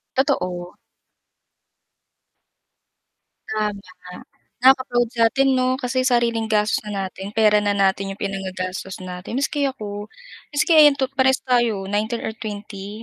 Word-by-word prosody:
Totoo. 180 -10 -1 2.7
Tama, 215 -1 -1 0.9
naka-proud 255 -2 +4
sa'tin 240 +4 +2
'no? 255 0 +2
Kasi 255 +1 0
sariling 235 -2 +1
gastos 215 0 +1
na - - -5 0.2
natin, 195 +2 -9
pera 215 -1 +4
na 205 -1 0
natin 195 0 +1
'yong - - -22
pinangagastos 190 -1 -4
natin. 180 +4 -7
Maski 285 0 0
ako, 210 -5 -5 0.5
maski 300 +4 +2
ayan 295 -2 +8
to 270 -1 -2
parehas 265 0 +3
tayo, 240 -6 +1
19 220 +3 -1
or - - -3
20 205 0 -7
220 Hz, 120 wpm, -22 LUFS, 200-255 Hz, 2.7 s, ayan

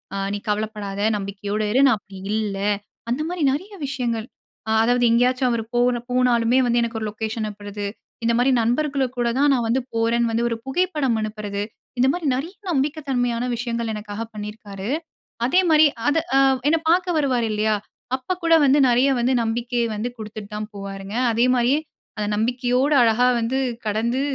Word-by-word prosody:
அ - - -2 0.2
நீ 205 - -1
கவலப்படாத 210 -1 -2 0.2
நம்பிக்கையோட 200 +1 -4
இரு, 250 - +3
நான் 260 - +4
அப்டி 200 -1 -13 0.2
இல்ல 205 -3 -2 0.5
அந்த 250 +5 0
மாரி 355 -1 -4
நெறைய 370 +10 -4
விஷயங்கள். 240 -5 -2 0.4
அ - - +1
அதாவது 245 +1 +2
எங்கயாச்சும் 250 +2 +3
அவர் 230 -1 -1
போ - - +3 0.3
போனாலுமே 245 -1 +3
வந்து, 240 0 +2
எனக்கு 235 -1 -2
ஒரு 220 - -3
லொக்கேஷன் 220 +1 -3
அனுப்புறது 205 0 -6 0.4
இந்த 235 0 +2
மாரி 250 +2 +3
நண்பர்களுக்கு 265 +2 0
கூட 240 -1 +1
தான் 290 +1 +4
நான் 240 -3 +1
வந்து 255 +3 +1
போறேன்னு 230 +1 +1
வந்து, 230 +1 0
1 230 - -2
புகைப்படம் 290 -5 0
அனுப்புறது 210 -2 -4 0.4
இந்த 255 - +4
மாரி 350 +1 -4
நெறைய 310 +8 -4 0.2
நம்பிக்க 290 +1 0
தன்மையான 245 -2 0
விஷயங்கள் 235 -1 -2
எனக்காக 210 0 -6
பண்ணியிருக்காரு. 210 -1 -7 0.6
அதே 360 +10 +4
மாரி 315 0 +6 0.2
அத 290 - +1 0.2
அ - - +6 0.3
என்ன 325 +2 +4
பார்க்க 355 0 +2
வருவாரு 255 -6 +1
இல்லையா? 215 0 +1 0.4
அப்ப 260 +7 -6
கூட 330 - +4
வந்து 275 +2 +5
நெறைய 250 +3 +4
வந்து 245 +2 +2
நம்பிக்கை 235 +2 -1
வந்து 225 +4 -2
குடுத்துட்டு 215 -1 -8
தான் 210 0 -4
போவாருங்க. 195 +1 -7 0.2
அதே 230 +2 +3
மாதிரியே 250 +4 +3 0.4
அந்த 210 -1 -1
நம்பிக்கையோட 250 +5 +1
அழகா 235 +2 +4
வந்து 240 +4 0 0.3
கடந்து 230 +5 0
235 Hz, 170 wpm, -22 LUFS, 215-260 Hz, 0.6 s, மாரி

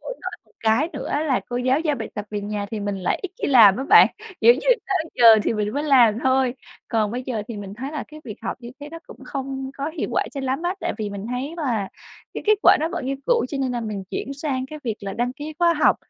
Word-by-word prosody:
khổ - - -10
nỗi - - -4
một - - -30
cái 225 +8 +2
nữa - - -5
là 275 -5 +1
cô 245 - -3
giáo 255 +4 +2
giao 300 -4 0
bài 225 - -5
tập 205 - -4
về 205 -1 -3
nhà 205 0 -3
thì 220 -2 -4
mình 200 -1 -2
lại 185 - -1
ít 385 - -4
khi - - +1
làm 225 -8 +7
á 265 - -3
bạn. - - +8 0.3
Kiểu 235 +2 +7
như, 265 - -5 0.3
tới 360 -5 -1
giờ 240 - +2 0.2
thì - - 0
mình 210 -1 -1
mới 285 - -1
làm 245 -7 +5
thôi. 260 -1 +2 0.3
Còn 220 -3 +1
bây 245 +3 -4
giờ 245 -5 -3
thì 230 - -5
mình 200 -1 -7
thấy 265 +5 -6
là 305 - -4
cái 305 0 -12
việc 215 - -7
học - - -3
như 240 -1 -9
thế 290 - -7
nó 330 - -7
cũng - - -13
không 270 -1 -5
có 280 +2 -2
hiệu 330 - -4
quả - - +2
cho 275 - -3
lắm 265 +4 -2
á. 355 +2 0
Tại - - -1
vì 210 -2 -3
mình 200 +1 -6
thấy 260 +6 -3
là 235 - -1 0.5
cái - - -5
kết 430 - +6
quả - - +7
đó 320 - 0
vẫn 260 - -3
như 275 - -1
cũ, - - +3
cho 280 - -4
nên 260 -2 -1
là 240 - -2
mình 210 -3 -5
chuyển 275 - -4
sang 275 -3 -3
cái 305 +3 -8
việc 220 -3 -2
là 195 -1 -5
đăng 245 +3 -1
ký 295 +3 -7
khóa 340 -1 +4
học 305 - +4
255 Hz, 285 wpm, -23 LUFS, 220-290 Hz, 0.5 s, bạn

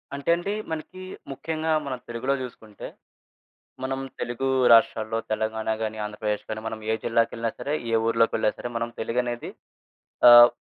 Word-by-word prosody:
అంటే 140 +2 -4
అండీ, 195 +4 -3 0.2
మనకీ 160 +4 -6 0.3
ముఖ్యంగా 160 +3 -3
మనం 130 -2 -4
తెలుగులో 120 +3 -1
జూసుకుంటే, 110 -4 -9 1.0
మనం 135 0 -2 0.2
తెలుగూ 120 +3 -2 0.2
రాష్ట్రాల్లో 115 -1 +4
తెలంగాణ 110 0 -2
గానీ, 110 0 -3
ఆంధ్రప్రదేశ్ 105 0 -3
గానీ, 110 0 -3
మనం 110 0 -4
ఏ - - +3
జిల్లాకెళ్ళినా 115 0 +1
సరే, 145 +2 -2 0.2
ఏ - - +3
ఊర్లోకెళ్ళినా 115 -1 +2
సరే, - - -4
మనం 115 0 -1
తెలుగనేది 120 +1 -2 0.8
ఆహ్, 120 0 +11
115 Hz, 135 wpm, -25 LUFS, 110-135 Hz, 1.0 s, ఆహ్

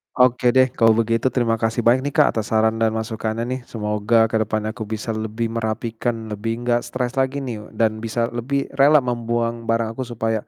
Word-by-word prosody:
Oke 125 0 +3
deh, 130 -1 +5
kalau 115 -2 +4
begitu, 115 +2 +1
terima 115 -3 0
kasih 115 +1 0
banyak 120 +2 +5
nih, 145 - -5
Kak, - - +5
atas 105 - -4
saran 110 0 +2
dan 110 -1 +1
masukannya 110 0 -3
nih. 130 - -2
Semoga 110 +1 +1
ke 110 - +1
depannya 110 0 -1
aku 110 -2 -7
bisa 110 +1 -4
lebih 110 +1 -3
merapikan, 115 0 -3
lebih 115 +3 -3
nggak 120 0 0
stres 130 +1 -2
lagi 135 +1 0
nih, 110 -5 -6
dan 110 -1 +1
bisa 115 +1 -2
lebih 135 +4 -2
rela 145 0 +6
membuang 120 -1 -2
barang 115 -1 +1
aku 125 +1 -5
supaya, 115 -2 -2
115 Hz, 195 wpm, -21 LUFS, 110-120 Hz, -, rela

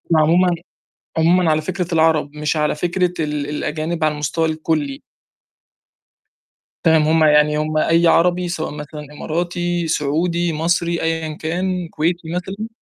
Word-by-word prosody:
عمومًا 170 +3 +4 0.6
عمومًا 170 0 +4
على 155 0 +1
فكرة 180 +1 -3
العرب 160 -2 +2
مش 150 +1 -1
على 150 0 +1
فكرة 180 +2 0
ال 150 -2 -2
الأجانب 155 +2 -3
على 155 -1 +2
المستوى 150 +2 -1
الكُلّي. 155 -3 -2 1.8
تمام، 160 -1 +5
هم 160 0 +3
يعني 150 0 +4
هم 155 0 -1
أي 165 +2 +3
عربي 180 +1 +3
سواء 160 -2 -3
مثلًا 150 0 -8
إماراتي، 175 +2 -2
سعودي، 165 +3 0
مصري 170 +2 0
أيًا 160 -1 -1
كان 180 +2 -2
كويتي 165 +1 -2
مثلًا. 195 +5 -4
160 Hz, 130 wpm, -19 LUFS, 155-175 Hz, 1.8 s, تمام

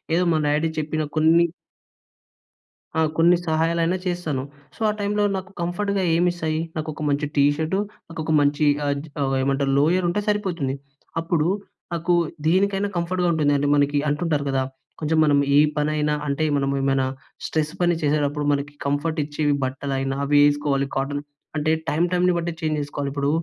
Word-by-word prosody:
ఏదో 180 - +3
మా - - +2
డాడీ 150 +2 +2
చెప్పిన 155 +1 -2
కొన్ని 160 +2 +5 1.5
ఆ! - - +4 0.2
కొన్ని 170 +2 +5
సహాయాలైనా 165 +2 +1
చేస్తాను. 175 -7 -2 0.3
సో, - - -17
ఆ - - +2
టైమ్‌లో 205 +1 0
నాకు 190 +1 -7
కంఫర్ట్‌గా 195 +3 -1
ఏమిస్తాయి? 170 -2 0 0.2
నాకు 155 -1 -3
ఒక 155 - -7
మంచి 145 +1 0
టీ 140 - +4
షర్ట్ 160 +3 -1 0.3
నాకొక 160 -1 -4
మంచి 145 +1 +2 0.2
ఆజ్ 140 +2 -2 0.2
అవేమంటారు 135 +1 +1
లోయర్ 175 +5 +2
ఉంటే 205 +4 0
సరిపోతుంది. 180 -10 -1 0.5
అప్పుడు 165 -1 +1 0.5
నాకు 170 +1 0 0.3
దీనికైనా 195 +3 +2
కంఫర్ట్‌గా 175 +1 0
ఉంటుందండి. 145 -2 +2
మనకి 145 0 +2
అంటుంటారు 150 -1 0
కదా! 135 -1 +1 0.4
కొంచెం 160 +1 0
మనం 145 -2 +4 0.2
ఏ - - +7 0.2
పనైనా 150 0 +1
అంటే 140 +2 -1
మనము 140 0 0
ఏమైనా 135 -1 +2 0.4
స్ట్రెస్ 155 -1 -1
పని 175 -1 +3
చేసేటప్పుడు 145 0 0
మనకి 145 0 -2
కంఫర్ట్ 145 +3 -1
ఇచ్చేవి 145 0 0
బట్టలైనా 135 0 -2
అవి 145 +1 +3
వేసుకోవాలి. 145 -1 +2
కాటన్ 145 +1 -1 0.4
అంటే 155 +1 +1 0.2
టైమ్ 160 +4 +2
టైమ్‌ని 180 0 +3
బట్టి 170 0 -2
చేంజ్ 155 -1 0
చేసుకోవాలి. 145 -1 -4
ఇప్పుడు 140 0 0
155 Hz, 150 wpm, -23 LUFS, 145-170 Hz, 1.5 s, ఏ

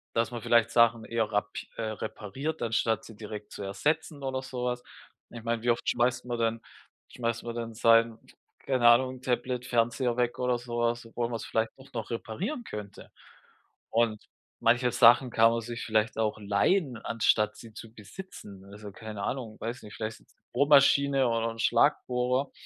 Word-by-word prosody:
Dass 115 +2 +1
man 120 -1 -5
vielleicht 115 +1 +3
Sachen 115 -1 +4
eher 115 -2 -1
rap 105 0 0 0.3
äh, 115 - -4
repariert, 110 +7 -5
anstatt 115 -1 0
sie 110 - -12
direkt 105 -1 -8
zu - - -8
ersetzen 145 +9 -2
oder 130 -1 -2
so 125 -2 -5
was. 125 0 -2 0.5
Ich 115 -1 -10
meine, 115 -1 -1
wie 120 - 0
oft 120 - 0
schmeißt 120 +1 +1
man 120 -1 -3
denn 115 0 0 0.5
schmeißt 115 -1 -3
man 120 0 -5
denn 115 -1 -4
sein, 115 0 +4 0.4
keine 130 -3 +2
Ahnung, 130 +2 +4
Tablet, 125 0 -2
Fernseher 120 +1 +1
weg 120 -1 0
oder 125 -1 +1
so 120 0 -5
was, 120 0 0
obwohl 115 +1 -3
man's 115 -1 -4
vielleicht 110 0 0
doch 130 0 -16
noch 115 -3 -4
reparieren 170 - -4
könnte. 105 - -9 0.8
Und 115 -2 +1 0.3
manche 120 +2 +3
Sachen 120 +2 +6
kann 115 0 +5
man 115 0 -1
sich 115 +1 -6
vielleicht 110 +1 +1
auch 110 -1 0
leihen, 120 - +1
anstatt 115 -1 +1
sie 115 -2 -12
zu 110 +1 -11
besitzen. 105 - -11
Also, 105 0 -9
keine 105 0 -8
Ahnung, 120 -5 -4
weiß 120 +3 -5
nicht, 105 - -11
vielleicht 110 0 -5 0.3
Bohrmaschine 140 0 +5
oder 115 0 0
'n 115 - -11
Schlagbohrer, 125 +2 +2
115 Hz, 170 wpm, -28 LUFS, 110-125 Hz, 0.8 s, Sachen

